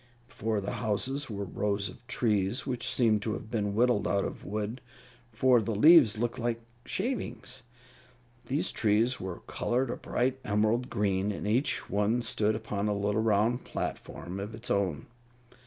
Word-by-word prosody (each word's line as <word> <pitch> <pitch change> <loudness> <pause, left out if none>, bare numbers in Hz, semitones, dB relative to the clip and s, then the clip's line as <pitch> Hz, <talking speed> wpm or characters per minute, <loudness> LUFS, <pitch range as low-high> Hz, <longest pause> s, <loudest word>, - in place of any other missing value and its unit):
Before 110 -1 -2
the 100 - -4
houses 130 +6 0
were 100 -2 -4
rows 100 +2 -1
of 120 +5 -13
trees 110 -1 0
which 125 -3 -1
seemed 110 -4 +3
to 110 +1 -2
have 110 - -7
been 105 -3 -1
whittled 120 -1 +3
out 100 -1 +1
of - - -6
wood, 110 +4 -4 0.5
for 125 +1 +4
the 110 0 -2
leaves 145 -2 +7
looked 120 +1 -2
like 115 -1 -1 0.3
shavings. 130 - -3 0.9
These 140 +6 +1
trees 115 +3 +2
were 95 -2 -6
colored 125 +1 -1
a - - -4
bright 130 +2 -1
emerald 110 +4 +1
green, 100 0 0
and 100 - -5
each 125 +7 +1
one 105 +4 +1
stood 110 -1 +1
upon 105 -2 -3
a 105 - +1
little 105 +2 0
round 110 +3 +2
platform 90 +3 -5
of 105 +3 -5
its 115 +2 -4
own. 95 -8 0
110 Hz, 160 wpm, -29 LUFS, 105-120 Hz, 0.9 s, leaves